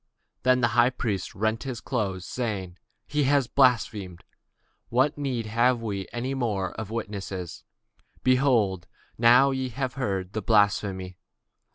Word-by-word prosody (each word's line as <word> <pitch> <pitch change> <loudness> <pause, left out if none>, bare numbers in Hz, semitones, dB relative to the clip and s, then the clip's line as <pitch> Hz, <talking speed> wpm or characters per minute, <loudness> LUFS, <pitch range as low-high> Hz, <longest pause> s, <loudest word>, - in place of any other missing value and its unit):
Then 125 0 +3
the 120 - +3
high 120 +2 +4
priest 105 -7 -3
rent 110 +2 0
his 130 -3 -5
clothes, 100 -8 -3
saying, 95 -6 -4 0.3
He 150 -1 0
hath 140 0 +3
spoken 115 - -15
blasphemy; 110 -8 +2 0.7
what 130 +5 +3
further 145 - -10
need 125 -5 -2
have 120 +3 +2
we 100 -4 -4
of 115 -6 -3
witnesses? 100 -5 -5 0.6
behold, 120 -9 +2 0.3
now 125 +4 +6
ye 130 -1 -2
have 130 +1 -3
heard 95 -8 -2
his 110 - -2
blasphemy. 95 -3 +1
115 Hz, 135 wpm, -26 LUFS, 100-130 Hz, 0.7 s, now